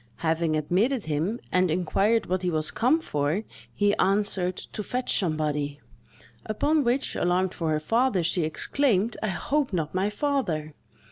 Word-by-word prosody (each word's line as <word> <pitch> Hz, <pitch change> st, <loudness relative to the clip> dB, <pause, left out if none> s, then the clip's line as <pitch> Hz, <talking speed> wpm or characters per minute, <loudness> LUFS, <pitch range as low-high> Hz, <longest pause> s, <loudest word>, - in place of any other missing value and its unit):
Having 160 Hz, 0 st, +1 dB
admitted 195 Hz, -, +1 dB
him, 160 Hz, +10 st, -1 dB
and 185 Hz, 0 st, +3 dB
inquired 195 Hz, +7 st, +1 dB
what 185 Hz, +1 st, -1 dB
he 180 Hz, -, 0 dB
was 155 Hz, -2 st, 0 dB
come 260 Hz, +8 st, +2 dB
for, 150 Hz, -, -1 dB, 0.3 s
he 205 Hz, 0 st, +2 dB
answered, 195 Hz, -2 st, +1 dB
"To -, -, -6 dB
fetch 250 Hz, +4 st, 0 dB
somebody." 150 Hz, -4 st, 0 dB, 0.6 s
Upon 290 Hz, +8 st, +1 dB
which, 245 Hz, +2 st, 0 dB
alarmed 180 Hz, +1 st, +1 dB
for 165 Hz, -2 st, -2 dB
her 155 Hz, -1 st, +1 dB
father, 225 Hz, +3 st, +1 dB
she 170 Hz, +2 st, +1 dB
exclaimed, 220 Hz, -, +1 dB
"I 220 Hz, -, -1 dB
hope 275 Hz, +8 st, -1 dB
not 160 Hz, -4 st, -2 dB
my 190 Hz, +2 st, +1 dB
father!" 210 Hz, -, -1 dB
185 Hz, 150 wpm, -26 LUFS, 160-230 Hz, 0.6 s, and